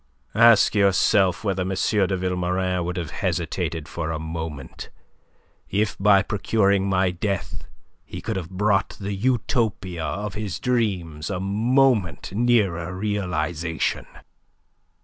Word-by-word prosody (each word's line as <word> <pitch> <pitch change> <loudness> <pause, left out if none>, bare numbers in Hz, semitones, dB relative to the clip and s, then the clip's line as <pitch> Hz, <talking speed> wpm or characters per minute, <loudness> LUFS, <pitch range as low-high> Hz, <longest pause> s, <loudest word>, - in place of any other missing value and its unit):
Ask 115 -1 +6
yourself 100 -1 +3
whether 95 -3 -1
M. 90 - -2
de 95 0 +1
Vilmorin 90 0 -1
would 90 +1 -4
have 85 -3 -4
hesitated 80 -3 -2
for 80 -2 -4
a 80 - -2
moment 80 -3 -6 0.8
if 100 0 0
by 100 0 +5
procuring 100 -2 +1
my 95 -1 +2
death 95 +2 -3 0.4
he - - -8
could 110 -1 -4
have 90 -3 -4
brought 100 0 0
the 100 0 -3
Utopia 100 -6 -1
of 100 +7 -3
his 105 -3 -4
dreams 95 -11 -1
a 95 -3 -2
moment 110 - +1
nearer 100 -7 +1
realization. 85 -6 -2
95 Hz, 120 wpm, -23 LUFS, 85-105 Hz, 0.8 s, Ask